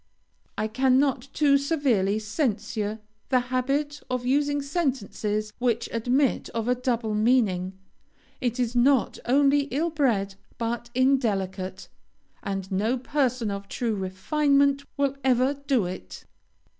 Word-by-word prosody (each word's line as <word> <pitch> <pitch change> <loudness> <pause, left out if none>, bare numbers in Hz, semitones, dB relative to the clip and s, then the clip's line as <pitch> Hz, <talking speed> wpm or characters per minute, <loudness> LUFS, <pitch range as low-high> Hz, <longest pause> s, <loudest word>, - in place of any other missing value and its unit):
I 215 - 0
cannot 260 +2 +2
too 280 -2 +3
severely 260 - +1
censure 215 -2 -2 0.3
the 255 - +4
habit 285 +3 0
of 250 -1 -2
using 285 +2 +1
sentences 240 - -2
which 240 -2 0
admit 250 +4 +1
of 230 0 -1
a 250 - +4
double 245 -3 -1
meaning. 210 -5 +2 0.7
It 245 -1 -1
is 245 0 -1
not 255 +1 +3
only 280 +2 +3
ill 305 +4 -1
bred, 230 -11 +1 0.2
but 235 0 -3
indelicate, 195 -8 0 0.5
and 195 -1 -4
no 215 +7 +1
person 255 -4 0
of 200 0 -5
true 230 +2 -2
refinement 280 +9 +1
will 280 -1 +1
ever 260 +1 +3
do 275 -6 0
it. 135 - -8
245 Hz, 120 wpm, -26 LUFS, 215-275 Hz, 0.7 s, the